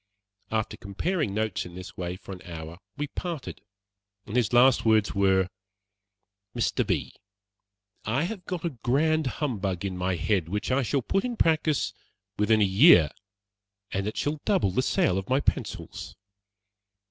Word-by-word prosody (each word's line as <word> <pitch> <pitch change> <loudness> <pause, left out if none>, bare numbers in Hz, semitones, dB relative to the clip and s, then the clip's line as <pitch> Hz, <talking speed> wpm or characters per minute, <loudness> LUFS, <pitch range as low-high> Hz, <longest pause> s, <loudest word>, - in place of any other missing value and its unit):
After 110 -1 -2
comparing 145 - -2
notes 110 -1 -1
in 90 -1 -11
this 90 0 -9
way 90 0 -4
for 95 - -11
an 95 -1 -8
hour, 80 -1 -8 0.2
we 145 - -1
parted, 160 - -6 0.6
and 105 - -7
his 120 -5 +2
last 125 +1 +5
words 110 -2 +3
were: 95 -1 +3 1.1
"Mr. 120 - 0
B., - - -1 0.9
I 120 +8 0
have 190 +1 -4
got 180 -2 -4
a 170 - 0
grand 145 +5 +1
humbug 100 - -2
in 95 -2 -3
my 90 0 -1
head, 85 -1 0
which 105 +5 -2
I 135 +2 +3
shall 135 +1 0
put 195 - 0
in 245 -2 -3
practice 155 -2 +2 0.4
within 110 +1 +3
a - - +6
year, 95 - +6 0.8
and 100 +1 -2
it 105 - -4
shall 145 0 -1
double 190 - +2
the 115 - +1
sale 140 - +2
of 95 - -9
my 130 +2 +3
pencils. - - -3
110 Hz, 160 wpm, -27 LUFS, 95-150 Hz, 1.1 s, a